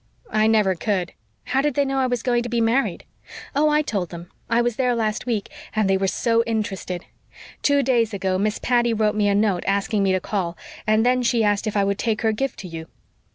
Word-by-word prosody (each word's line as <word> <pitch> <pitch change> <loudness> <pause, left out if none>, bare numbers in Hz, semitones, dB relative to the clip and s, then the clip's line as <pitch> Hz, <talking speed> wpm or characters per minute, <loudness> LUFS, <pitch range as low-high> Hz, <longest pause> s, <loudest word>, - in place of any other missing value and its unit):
"I 215 0 +3
never 215 -4 +3
could. 185 -1 -2 0.3
How 260 +2 +1
did 290 -2 0
they 285 - +2
know 270 0 -1
I 260 - +2
was 245 -2 -2
going 240 -1 +2
to 240 - -5
be 240 0 0
married?" 230 +4 +1 0.5
"Oh, 300 +2 +3
I 300 0 +3
told 195 - -2
them. 170 0 -10 0.2
I 230 0 +3
was 240 -1 +1
there 250 -2 +2
last 220 0 -2
week. 220 -5 -1 0.3
And 215 -2 +2
they 195 - +3
were 190 0 0
so 230 +4 +1
interested. 200 -5 -3 0.6
Two 285 -1 +3
days 235 -3 +2
ago 190 -2 -1
Miss 210 +1 0
Patty 240 -2 +1
wrote 215 -1 +2
me 210 -1 +1
a 200 - +2
note 205 -3 +1
asking 200 +2 +1
me 195 -1 +2
to 185 - +2
call; 180 -3 -3 0.3
and 215 +1 +3
then 250 0 +3
she 235 -2 +2
asked 205 +1 +1
if 215 - -1
I 200 - +3
would 200 0 -1
take 225 -1 -1
her 220 - +3
gift 265 +5 -2
to 190 - -8
you. 165 -1 -7
220 Hz, 235 wpm, -22 LUFS, 200-240 Hz, 0.6 s, I